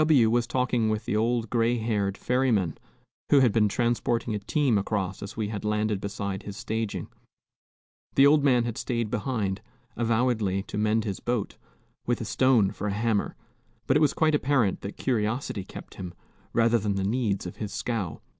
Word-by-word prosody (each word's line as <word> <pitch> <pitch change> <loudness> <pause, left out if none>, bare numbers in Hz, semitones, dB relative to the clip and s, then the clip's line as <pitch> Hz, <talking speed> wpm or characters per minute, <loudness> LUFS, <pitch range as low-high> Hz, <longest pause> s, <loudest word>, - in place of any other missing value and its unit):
W 135 -8 +4
was 120 0 +2
talking 125 -3 +1
with 110 0 -2
the - - -1
old 115 +1 +1
gray 120 0 +2
haired 105 -4 -1
ferryman, 120 - +1 0.5
who 145 - +6
had 125 -4 +5
been 105 -1 +3
transporting 120 0 0
a 105 - -1
team 130 0 +1
across 95 -2 -2
as 100 +2 -8
we 105 -2 -1
had 105 -2 -5
landed 105 -1 0
beside 100 -1 -4
his 100 -1 -8
staging. 110 -1 -3 1.1
The 135 - +7
old 145 0 +5
man 125 -4 +4
had 115 -2 -4
stayed 115 -3 -2
behind, 105 -4 -1 0.3
avowedly 115 -4 +1
to - - -6
mend 110 +1 +2
his 100 -3 -4
boat, 120 -4 -2 0.5
with 120 - +1
a 115 - -4
stone 110 -2 +3
for 105 - -4
a 100 - -1
hammer, 110 -1 0 0.5
but 130 - +2
it - - +5
was 150 -3 +3
quite 155 -1 +3
apparent 135 -9 +2
that 100 - -7
curiosity 110 -3 -1
kept - - -11
him, 90 -2 -8 0.4
rather 115 0 +3
than 100 -1 -1
the 95 - -1
needs 105 -2 0
of 90 - -7
his 105 -2 -5
scow. 105 -3 -3
110 Hz, 185 wpm, -27 LUFS, 100-120 Hz, 1.1 s, The